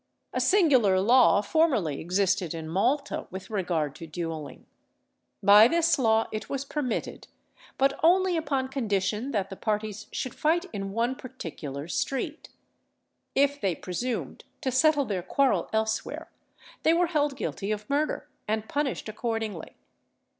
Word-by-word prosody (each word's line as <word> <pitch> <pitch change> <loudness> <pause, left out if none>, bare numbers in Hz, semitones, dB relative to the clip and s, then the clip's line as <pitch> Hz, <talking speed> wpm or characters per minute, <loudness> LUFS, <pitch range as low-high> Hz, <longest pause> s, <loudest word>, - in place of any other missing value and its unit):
A - - 0
singular 260 - +4
law 230 0 +5
formerly 220 - +1
existed 185 -1 0
in 160 -1 -6
Malta 235 - 0
with 190 +3 -8
regard 175 -8 -1
to 165 - -9
duelling. 160 -2 -6 0.8
By 205 +3 +8
this 335 0 +2
law 225 -2 +3
it 215 0 -5
was 275 0 -3
permitted, 275 -4 -3 0.5
but 275 +1 +2
only 365 +2 +4
upon 275 -5 -1
condition 215 -2 -1
that 200 -7 -2
the - - -5
parties 215 0 -3
should 255 - -4
fight 335 +4 +1
in 195 -1 -4
one 235 +3 +1
particular 160 - -7
street. 275 - -3 0.9
If 285 +1 +2
they 190 -4 +1
presumed 190 +10 -4 0.2
to 260 - -1
settle 290 +2 +3
their 200 -5 -2
quarrel 270 +9 +1
elsewhere, 220 0 -2 0.5
they 320 - +4
were 355 +1 +3
held 295 -4 0
guilty 210 -5 -3
of 210 0 -3
murder, 290 +2 -1 0.2
and 220 0 -1
punished 285 -5 -2
accordingly. 220 -5 -4
225 Hz, 140 wpm, -27 LUFS, 195-280 Hz, 0.9 s, By